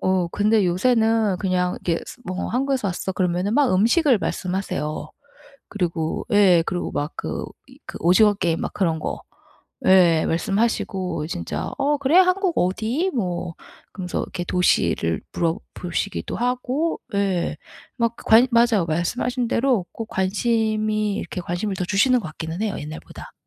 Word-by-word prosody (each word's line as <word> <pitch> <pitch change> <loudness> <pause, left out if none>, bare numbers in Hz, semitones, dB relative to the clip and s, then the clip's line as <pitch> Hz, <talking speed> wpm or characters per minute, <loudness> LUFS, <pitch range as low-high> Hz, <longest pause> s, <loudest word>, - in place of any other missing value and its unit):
어 185 -2 +1
근데 210 +2 +2
요새는 220 +1 +2
그냥 180 -2 0
이렇게 170 -1 0 0.2
뭐 185 0 -3
"한국에서 260 -2 0
왔어." 185 +1 -3
그러면은 185 +2 0
막 285 -6 +3
음식을 235 - +4
말씀하세요. 180 -6 -3 0.6
그리고 170 -5 -2
예 190 -5 +5
그리고 180 -1 -2
막 145 +1 -2
그 - - -4 0.2
이 - - -17
그 - - -8
오징어 205 +5 +5
게임 170 -4 -1
막 - - -3
그런 165 -5 0
거 - - -4 0.7
예 175 -4 +5
말씀하시고 190 -2 -1
진짜 85 - -4
"어 290 +1 +2
그래 280 +4 +1
한국 370 -1 +4
어디?" 225 - 0
뭐 175 -5 -2 0.4
그러면서 180 -3 -4
이렇게 175 - -5
도시를 85 - +1
물어 170 +1 0 0.2
보시기도 180 +3 -3
하고 250 +6 -1 0.2
예 195 -3 0 0.4
막 235 -1 0
관 230 +3 +5
맞아요. 230 -6 +3
말씀하신 240 +10 -1
대로 240 -6 +1
꼭 225 - -6
관심이 215 +1 0
이렇게 180 - -5
관심을 185 +4 -3
더 185 - -2
주시는 245 +7 +3
것 185 - -6
같기는 160 +4 -6
해요 210 -2 -1
옛날보다. 150 +1 -9
195 Hz, 310 characters per minute, -22 LUFS, 175-230 Hz, 0.7 s, 예